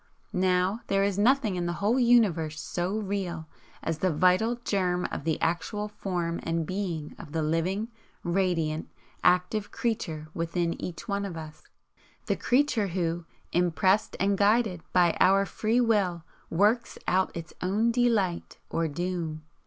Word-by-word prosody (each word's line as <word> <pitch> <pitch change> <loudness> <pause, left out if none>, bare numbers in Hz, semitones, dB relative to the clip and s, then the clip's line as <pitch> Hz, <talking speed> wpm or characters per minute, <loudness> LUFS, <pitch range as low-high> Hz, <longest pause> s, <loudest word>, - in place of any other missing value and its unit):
Now 185 +4 +1
there 195 0 +2
is 200 -1 0
nothing 230 -2 +3
in 175 -1 -1
the 170 - -1
whole 220 +6 +2
Universe 200 -11 +3
so 180 +4 -2
REAL 190 -6 -3 0.4
as 160 -1 -2
the 185 - +2
Vital 185 +9 +3
Germ 180 -3 +1
of - - -5
the 160 -1 0
actual 190 +5 -1
Form 175 -5 -3
and 165 0 -1
Being 175 -5 -3
of 150 - -10
the 160 -1 0
living, 175 +7 0 0.4
radiant, 170 -4 0 0.3
active 180 +4 +2
Creature 160 -10 -3
within 170 0 -1
each 175 +4 -6
one 200 -1 -1
of 185 -4 -5
us, 155 -1 -9 0.6
the - - +1
creature 250 -5 +2
who, 170 -2 -2 0.3
impressed 185 +4 +2
and 195 0 +1
guided 205 -3 +3
by 175 -2 +4
our 195 +1 +5
Free 225 +4 0
Will, 200 -8 +2 0.3
works 210 +7 +2
out 185 -1 +1
its 165 0 -7
own 210 +6 +2
delight 225 -7 +1
or 165 0 0
doom. 165 0 -3
185 Hz, 145 wpm, -28 LUFS, 170-205 Hz, 0.6 s, our